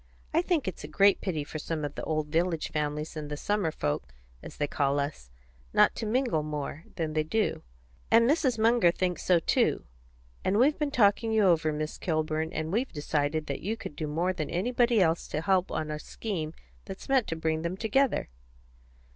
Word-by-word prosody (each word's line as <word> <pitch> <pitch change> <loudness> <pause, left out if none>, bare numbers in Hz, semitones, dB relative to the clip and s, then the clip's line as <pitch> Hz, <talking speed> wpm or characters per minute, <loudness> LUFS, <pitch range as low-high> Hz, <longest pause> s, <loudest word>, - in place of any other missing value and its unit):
I 330 - +4
think 345 - 0
it's 185 - -4
a - - -5
great 195 +6 +4
pity 160 -6 -2
for 155 +2 -6
some 155 0 -3
of 145 - -5
the - - -6
old 155 -1 -1
village 165 0 0
families 150 +1 -2
and 150 -1 -5
the 150 - -4
summer 205 0 0
folks, 75 - -3 0.3
as - - -10
they 145 - +1
call 140 -1 0
us, 140 - -4 0.4
not - - +5
to 220 - -3
mingle 235 - +1
more 150 +1 -5
than 160 -3 -2
they 155 - +2
do, 210 +8 0 0.5
and 230 +1 +6
Mrs. 270 -4 +2
Munger 225 -4 +4
thinks 180 0 -1
so 180 - +4
too; 165 - +1 0.6
and 195 - +1
we've 280 +6 +4
been 300 -1 0
talking 225 -3 +3
you 220 -1 +3
over, 165 -4 +3
Miss 155 0 -4
Kilburn, 155 -1 -1
and 160 -2 -3
we've 240 +7 0
decided 150 0 -1
that 140 - -4
you 220 +5 -2
could 150 - -8
do 155 +1 -3
more 170 +5 0
than 155 -5 -4
anybody 235 +5 +2
else 165 -3 +2
to 150 - -3
help 185 +1 +2
on 155 -1 -2
a 150 - -4
scheme 165 -5 -5 0.3
that's 195 -2 -8
meant 265 -4 +3
to 165 - -2
bring 160 -1 -1
them 170 +3 -3
together." 245 - +1
165 Hz, 200 wpm, -28 LUFS, 155-215 Hz, 0.6 s, and